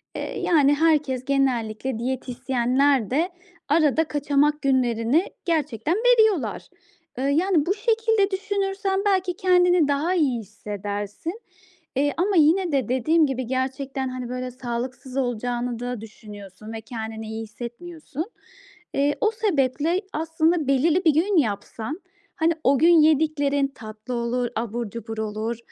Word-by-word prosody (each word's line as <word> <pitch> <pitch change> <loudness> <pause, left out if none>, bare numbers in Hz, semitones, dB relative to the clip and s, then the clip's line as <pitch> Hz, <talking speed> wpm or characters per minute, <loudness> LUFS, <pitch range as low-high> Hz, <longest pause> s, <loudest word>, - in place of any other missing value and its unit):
eee, - - -4
yani, 290 -4 +4
herkes 295 -5 +1
genellikle 255 -3 0
diyetisyenler 255 0 0
de 325 +7 +1 0.4
arada 310 0 +3
kaçamak 295 0 +1
günlerini 255 - +2 0.2
gerçekten 305 - 0
veriyorlar. 440 - +2 0.5
Eee, 260 - -2
yani, 315 +3 +2
bu 385 - +2
şekilde 445 -2 +1
düşünürsen 390 0 -1
belki 375 -3 +1
kendini 360 -3 +4
daha 290 +5 +1
iyi 275 -8 +1
hissedersin, 205 - -6 0.5
eee, 285 +2 +1
ama 390 +3 +1
yine 335 +3 +4
de 270 -6 0
dediğim 310 +6 +3
gibi 260 -2 -3
gerçekten, 265 +1 -2
hani, 255 -1 -5
böyle, 255 0 -4
sağlıksız 255 +2 -5
olacağını 245 -1 -2
da 245 -2 -4
düşünüyorsun 210 -1 -11
ve 220 - -6
kendini 220 -2 -6
iyi 220 +1 -5
hissetmiyorsun. 280 +8 -7 0.7
Eee, 285 +1 +1
o 435 - +3
sebeple 335 - 0
aslında 320 -1 +1
belirli 315 +7 +2
bir 315 - +6
gün 355 +5 +2
yapsan, 225 - -2 0.3
hani, 325 +1 +2
o 275 +1 +4
gün 335 0 +6
yediklerin 290 -2 +2
tatlı 220 -1 -9
olur, 240 +1 -1
abur 230 0 -3
cubur 225 0 -7
olur 220 +2 -3
275 Hz, 130 wpm, -24 LUFS, 240-330 Hz, 0.7 s, bir